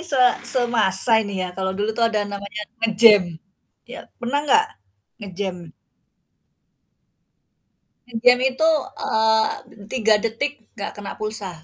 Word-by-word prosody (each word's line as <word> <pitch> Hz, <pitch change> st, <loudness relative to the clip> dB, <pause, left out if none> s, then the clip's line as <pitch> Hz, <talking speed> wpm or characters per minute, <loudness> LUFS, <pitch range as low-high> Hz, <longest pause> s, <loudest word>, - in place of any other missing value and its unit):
se 345 Hz, -5 st, -1 dB, 0.3 s
semasa 230 Hz, -3 st, +3 dB
ini 205 Hz, -2 st, -5 dB
ya 180 Hz, -, -7 dB
kalau 190 Hz, 0 st, -3 dB
dulu 210 Hz, +2 st, -2 dB
tuh 230 Hz, +1 st, +1 dB
ada 215 Hz, -2 st, -1 dB
namanya 200 Hz, +1 st, -7 dB, 0.2 s
nge-jam, 210 Hz, -6 st, +4 dB, 0.5 s
ya, -, -, -10 dB, 0.2 s
pernah 250 Hz, +4 st, -2 dB
nggak 290 Hz, -2 st, +3 dB, 0.6 s
nge-jam? 185 Hz, -3 st, -6 dB, 2.4 s
Nge-jam 245 Hz, +1 st, +3 dB
itu, 315 Hz, +5 st, +1 dB, 0.3 s
eee, 220 Hz, -2 st, -1 dB
3 220 Hz, -4 st, +2 dB
detik 230 Hz, +5 st, -2 dB, 0.2 s
nggak 200 Hz, -, -5 dB
kena 205 Hz, -1 st, -7 dB
pulsa. 215 Hz, -2 st, -5 dB
220 Hz, 115 wpm, -21 LUFS, 200-235 Hz, 2.4 s, nge-jam